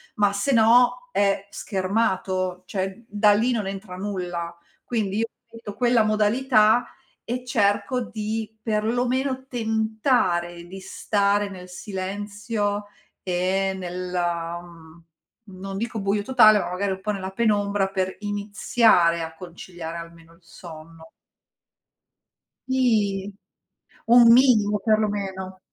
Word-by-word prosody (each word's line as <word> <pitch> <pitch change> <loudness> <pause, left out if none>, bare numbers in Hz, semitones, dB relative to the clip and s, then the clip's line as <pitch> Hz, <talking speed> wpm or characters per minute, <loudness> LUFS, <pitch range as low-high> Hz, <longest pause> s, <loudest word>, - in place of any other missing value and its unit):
ma 205 -1 +2
se 200 +7 0
no 245 +5 +4
è 200 -3 +1
schermato, 185 -2 -1
cioè 190 +4 -4
da 210 -1 +3
lì 230 +5 +2
non 220 -4 -1
entra 195 -1 -7
nulla. 180 -3 -4 0.3
Quindi, 210 -4 -2
io 230 - 0 0.2
ripeto 230 -3 -10
quella 240 -2 +3
modalità 215 +2 +3 0.4
e 250 +1 -4
cerco 235 +2 +1
di, 220 0 -5
perlomeno, 245 +5 -1
tentare 220 -7 0
di 190 +2 -9
stare 200 +1 0
nel 180 -2 -10
silenzio 205 +2 -4 0.4
e 190 +1 0
nella, 175 -2 -3
mhmm, 165 -1 -16 0.6
non 195 0 -6
dico 230 +1 -3
buio 200 +1 0
totale, 215 -4 +6
ma - - -3
magari 195 +2 -1
un 190 - -4
po' 210 - -1
nella 190 -2 -4
penombra 205 -2 +1
per 190 -1 -2
iniziare 205 -3 +2
a 160 0 -5
conciliare 175 -1 -8
almeno 170 0 -11
il 170 - -23
sonno. 165 -1 -13 1.6
Sì. 210 -7 +1 0.8
Un 235 0 +7
minimo, 225 -5 +4
perlomeno. 200 -4 -1
205 Hz, 115 wpm, -24 LUFS, 185-220 Hz, 1.6 s, Un